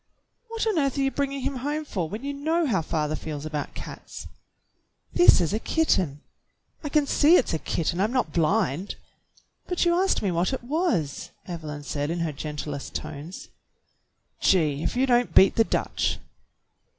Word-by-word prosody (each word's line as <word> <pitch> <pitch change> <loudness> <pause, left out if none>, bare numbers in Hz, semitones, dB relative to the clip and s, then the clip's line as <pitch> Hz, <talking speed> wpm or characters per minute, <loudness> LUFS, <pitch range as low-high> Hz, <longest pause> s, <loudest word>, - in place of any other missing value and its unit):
"What 455 0 -3
on 425 -7 +1
earth 275 -1 0
are - - +1
you 270 0 +1
bringing 275 -1 -2
him 270 +1 -2
home 295 +4 -3
for 180 - -3
when 215 +6 -6
you 285 0 -3
know 320 +4 0
how 210 - +1
father 155 -1 -1
feels 150 -2 -6
about 150 -2 -4
cats?" - - -8 0.9
"This 350 - +7
is 175 +1 0
a 215 - 0
kitten." 185 - +1 0.6
"I 295 - -3
can 295 0 +3
see 300 +4 +5
it's 265 - +2
a 160 - 0
kitten. 170 +3 -1
I'm 210 +3 +1
not 255 -1 0
blind." 180 0 +1 0.7
"But 360 0 0
you 345 - +4
asked 375 - +2
me 195 - +1
what 175 +7 0
it 265 - -4
was," 275 - -1 0.2
Evelyn 155 -4 -6
said 145 +1 -3
in 170 +1 -2
her 165 -2 -1
gentlest 150 -1 -6
tones. 155 +6 -7 0.9
"Gee! 155 -6 +2
If - - -2
you 255 +2 +3
don't 245 -2 +2
beat 190 - +7
the 225 - +5
Dutch - - -1
205 Hz, 175 wpm, -25 LUFS, -, 0.9 s, This